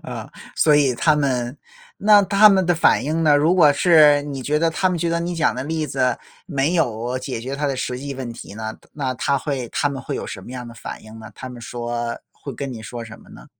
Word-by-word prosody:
呃， - - -7 0.3
所 150 -2 +4
以 140 -4 +3
他 155 +5 +3
们， 130 -2 -1 0.4
那 205 0 +6
他 200 +2 +6
们 190 -2 +3
的 175 - +3
反 165 - +3
应 160 +3 -1
呢？ 150 -2 +5
如 155 +5 +3
果 155 -6 +6
是 150 -2 +5
你 140 -2 -6
觉 150 +4 0
得 165 +1 +2
他 185 +3 +1
们 180 -2 -2
觉 170 - -1
得 170 0 0
你 175 +1 -3
讲 160 -2 +1
的 130 - -4
例 160 +1 -2
子 130 -3 0 0.3
没 150 +1 0
有 125 -4 -1
解 130 -2 -5
决 130 +4 -5
他 145 - -1
的 135 -2 -1
实 125 -1 -3
际 140 +1 -6
问 130 -2 -6
题 115 - -10
呢？ 110 0 -6 0.2
那 130 -3 -3
他 140 +3 0
会 130 -4 -3
他 145 - 0
们 140 -2 -6
会 - - -4
有 - - -5
什 - - -7
么 - - -11
样 125 -1 -7
的 115 - -11
反 - - -8
应 110 0 -12
呢？ 110 - -10
他 130 - -8
们 125 -1 -10
说 120 0 -4
会 140 - -9
跟 135 +2 -5
你 115 -2 -8
说 120 +1 -7
什 110 -1 -11
么 - - -19
呢？ - - -13
140 Hz, 275 characters per minute, -21 LUFS, 125-160 Hz, 0.4 s, 那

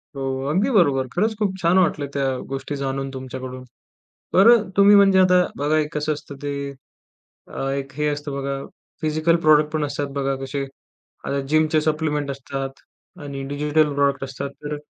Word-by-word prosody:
हो. 135 - -5 0.3
अगदी 195 - +1
बरोबर. 140 -8 +3
खरंच 220 - +1
खूप 205 -3 0
छान 170 +2 +3
वाटलं 160 -5 +1
त्या 140 -1 0 0.2
गोष्टी 135 +2 -4
जाणून 135 0 -3
तुमच्याकडून. 130 -1 -7 0.7
बरं 225 +3 +7
अ, 185 - -12
तुम्ही 200 +1 +7
म्हणजे 195 -1 +6
आता 180 -1 +5
बघा 150 +2 +1
एक 150 +1 -2
कसं 150 +1 0
असतं 145 -1 -9
ते 145 0 -2 0.9
अ, 135 - -4
एक 140 0 -4
हे 150 +1 -1
असतं 145 -1 -3
बघा, 140 0 -3 0.5
फिजिकल 155 +2 +2
प्रॉडक्ट 150 -1 +4
पण 155 -1 0
असतात 145 0 -3
बघा 135 0 0
कसे 140 +1 -3 0.6
आता 140 0 -1
जिमचे 155 0 +3
सप्लिमेंट 150 -2 -1
असतात 135 0 -5 0.5
आणि 140 -1 -6
डिजिटल 150 +1 +1
प्रॉडक्ट 140 -1 +1
असतात, 135 +1 -5 0.2
तर 150 0 -3
145 Hz, 165 wpm, -22 LUFS, 140-155 Hz, 0.9 s, बरं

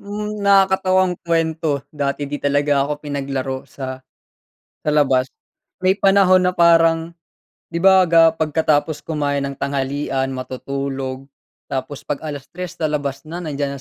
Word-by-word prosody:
hmm, 210 +1 -5
nakakatawang 190 -2 +3
kuwento 160 -4 -1
dati 145 -1 -2
'di 145 +1 -5
talaga 145 0 +2
ako 150 - -2
pinaglaro 135 -2 -4
sa 130 -1 -6 0.8
sa - - 0
labas 135 -3 +2 0.5
may 185 +1 +3
panahon 195 -2 +4
na 180 - +2
parang 165 -1 +3 0.6
'di 170 - -2
ba 190 -1 +6
ga 165 -1 +6
pagkatapos 155 -1 0
kumain 145 -3 -1
ng 140 - -8
tanghalian, 135 -1 -2
matutulog 135 +1 -5 0.4
tapos 135 +1 -5
pag 145 - -3
3:00 155 +4 -7
lalabas 150 -3 -2
na 170 +3 -6
nandiyan 140 -3 -3
150 Hz, 125 wpm, -20 LUFS, 140-170 Hz, 0.8 s, ba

